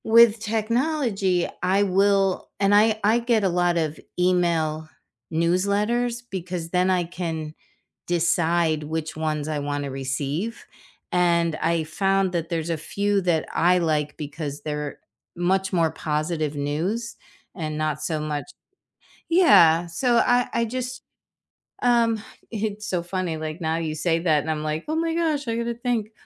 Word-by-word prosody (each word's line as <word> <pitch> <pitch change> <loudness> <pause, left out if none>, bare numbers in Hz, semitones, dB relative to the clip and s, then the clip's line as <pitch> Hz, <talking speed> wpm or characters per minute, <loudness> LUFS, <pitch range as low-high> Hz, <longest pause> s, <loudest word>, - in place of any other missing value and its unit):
With 230 0 +6
technology, 220 - 0
I 195 +2 +3
will 195 0 +2
and 200 0 +3
I 215 +1 +4
I 220 +3 +4
get 235 -3 +1
a 190 - +3
lot 175 0 +1
of 155 -2 -1 0.2
email 170 -4 +1 0.4
newsletters 200 +8 +1
because 180 -3 -4
then 180 +1 +2
I 180 -1 +2
can 165 -3 -5 0.5
decide 170 -2 +1
which 160 +1 -4
ones 155 -1 -2
I 155 -1 -1
wanna 145 -1 -3
receive 140 - -3 0.5
and 170 -2 +2
I 165 0 0
found 195 +3 +1
that 165 -2 -2
there's 165 0 -2
a 165 - 0
few 200 +5 0
that 170 -3 +1
I 180 +1 +3
like 155 -3 0
because 150 -1 -6
they're 150 -1 -4 0.4
much 190 +2 0
more 165 -3 +2
positive 155 0 -2
news 180 +12 -2 0.4
and 155 -3 -4
not 155 -1 -1
so 155 -2 -1
much 150 - -4 0.8
Yeah. 175 - +6
So, 240 +9 +1
I 245 +1 +3
I 235 - +2
just 255 +2 -4 0.8
um, 235 -2 +3 0.3
it's 215 -1 -3
so 180 -2 -1
funny, 175 -2 -3
like, 155 +2 -5
now 160 -1 0
you 160 -2 -2
say 165 +1 +1
that 160 -3 +3
and 160 - -4
I'm 155 -1 -2
like, 155 +1 -3
"Oh 310 - 0
my 330 0 0
gosh, 315 -4 0
I 230 - 0
gotta 235 0 -2
think." 235 -3 -2
175 Hz, 150 wpm, -24 LUFS, 155-215 Hz, 0.8 s, With